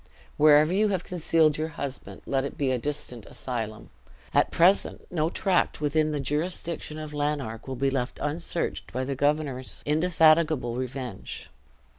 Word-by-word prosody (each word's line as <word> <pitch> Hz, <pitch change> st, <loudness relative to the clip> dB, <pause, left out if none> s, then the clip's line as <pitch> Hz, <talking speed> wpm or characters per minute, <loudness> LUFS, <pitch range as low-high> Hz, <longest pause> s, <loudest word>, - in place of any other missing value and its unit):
Wherever 150 Hz, +2 st, +6 dB
you 210 Hz, +3 st, +3 dB
have 190 Hz, -4 st, -1 dB
concealed 160 Hz, -3 st, +2 dB
your 155 Hz, -, 0 dB
husband, 140 Hz, -2 st, -6 dB
let 135 Hz, -1 st, 0 dB
it 140 Hz, -, -5 dB
be 135 Hz, -2 st, +1 dB
a 125 Hz, -, 0 dB
distant 125 Hz, -4 st, -5 dB
asylum. 115 Hz, -4 st, -5 dB, 0.4 s
At -, -, +4 dB
present 180 Hz, +4 st, +3 dB
no 160 Hz, -2 st, +1 dB
tract 185 Hz, 0 st, +1 dB
within 155 Hz, +1 st, +1 dB
the 150 Hz, -, -1 dB
jurisdiction 155 Hz, +2 st, -2 dB
of 155 Hz, -1 st, -7 dB
Lanark 145 Hz, -7 st, -2 dB
will 130 Hz, -, -3 dB
be 135 Hz, +2 st, +1 dB
left 130 Hz, -2 st, -2 dB
unsearched 165 Hz, +3 st, -2 dB
by 130 Hz, +2 st, -2 dB
the 135 Hz, +1 st, -2 dB
governor's 140 Hz, -2 st, -1 dB
indefatigable 155 Hz, -4 st, +3 dB
revenge." 125 Hz, -4 st, -6 dB
150 Hz, 150 wpm, -27 LUFS, 130-160 Hz, 0.4 s, Wherever